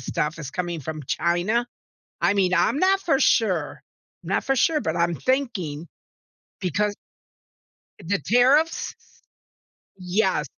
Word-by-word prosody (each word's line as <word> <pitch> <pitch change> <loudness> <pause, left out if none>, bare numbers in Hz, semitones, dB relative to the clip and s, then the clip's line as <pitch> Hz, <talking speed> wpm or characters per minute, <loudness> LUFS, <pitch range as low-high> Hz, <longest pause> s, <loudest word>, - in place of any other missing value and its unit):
stuff 150 +4 -2
is 140 -4 -6
coming 175 -1 -3
from 155 +2 -6
China. 185 +8 0 0.6
I - - +3
mean, 185 -2 +1
I'm 185 - +2
not 385 +1 +3
for 275 -8 +1
sure. 180 - +1 0.4
Not 185 +4 -1
for 270 +1 +1
sure, 305 +4 +2
but - - -2
I'm 170 0 +1
thinking 190 - -2 0.7
because 205 +3 0 1.1
the 190 +3 -1
tariffs. 265 - +3 1.0
Yes. 185 +3 0
190 Hz, 120 wpm, -24 LUFS, 170-245 Hz, 1.1 s, I